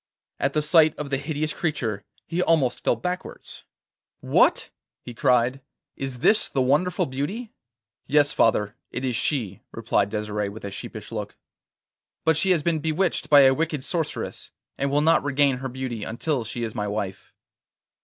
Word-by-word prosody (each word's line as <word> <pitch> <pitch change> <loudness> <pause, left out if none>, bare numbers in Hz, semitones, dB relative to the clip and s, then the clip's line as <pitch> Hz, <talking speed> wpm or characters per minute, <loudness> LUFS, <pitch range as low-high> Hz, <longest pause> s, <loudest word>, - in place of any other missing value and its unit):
At 135 +1 0
the 150 - +1
sight 155 0 +5
of 145 -2 -5
the 135 - +2
hideous 150 +1 -2
creature 115 - -2 0.2
he 175 +1 -2
almost 150 -8 +2
fell - - +3
backwards. 180 +10 -6 0.5
'What!' - - +2 0.3
he 120 - -8
cried. 125 +3 +2 0.3
'Is 135 -2 -5
this 215 0 +4
the 135 - -2
wonderful 145 +8 +2
beauty?' 175 - -4 0.6
'Yes, 145 0 +3
father, 105 -2 +2
it 130 - -4
is 125 -2 -1
she,' 110 - -2
replied 100 0 0
Desire 105 -1 -2
with 105 +1 -9
a 100 - -5
sheepish 105 +2 -8
look. 105 -2 -5 0.9
'But 160 -1 +4
she 190 +5 +1
has 170 -5 +3
been 165 -1 +1
bewitched 160 +4 0
by 145 -2 +8
a 135 -1 +6
wicked 150 -2 -2
sorceress, 165 0 -3 0.3
and 140 - -1
will 145 +1 +2
not 165 +2 +4
regain 140 -1 +2
her 130 +1 -5
beauty 125 -4 -5
until 120 +4 -2
she 120 +2 -5
is 110 -1 -3
my 105 -1 -2
wife. 100 -2 -4
135 Hz, 165 wpm, -24 LUFS, 115-155 Hz, 0.9 s, by